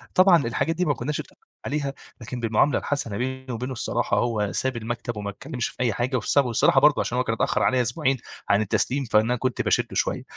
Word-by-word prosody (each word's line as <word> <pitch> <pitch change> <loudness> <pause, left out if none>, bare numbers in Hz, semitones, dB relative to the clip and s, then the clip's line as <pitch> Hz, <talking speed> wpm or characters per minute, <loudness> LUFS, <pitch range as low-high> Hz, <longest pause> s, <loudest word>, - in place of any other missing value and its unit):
طبعًا 185 -6 +6
الحاجات 160 +7 -1
دي 180 +2 0
ما 145 - +2
كنّاش 140 +4 -3
أتفقنا - - -10 0.3
عليها، 140 -2 -2 0.3
لكن 120 +2 -6
بالمعاملة 115 +5 +2
الحسنة 115 -8 -2
بيني 130 +1 -3
وبينه 125 +3 -4
الصراحه 120 - -1
هو 110 -4 0
ساب 130 +6 -1
المكتب 115 0 -4
وما 100 -1 -4
اتكلمش 125 +4 -4
في - - -4
أي 120 -3 +1
حاجة، 125 +5 -1
وسابه 135 +2 +2
الصراحة، 135 +5 +4
برضه 150 0 +6
علشان 125 - -1
هو 125 - +2
كان 115 -2 -1
اتأخر - - 0
عليا 130 -1 +3
أسبوعين 130 +3 0 0.3
عن 100 +1 +4
التسليم، 125 +6 0
فأنا 110 +2 +2
كنت 130 0 -1
باشده - - +1
شوية. - - 0
125 Hz, 210 wpm, -24 LUFS, 115-140 Hz, 0.3 s, طبعًا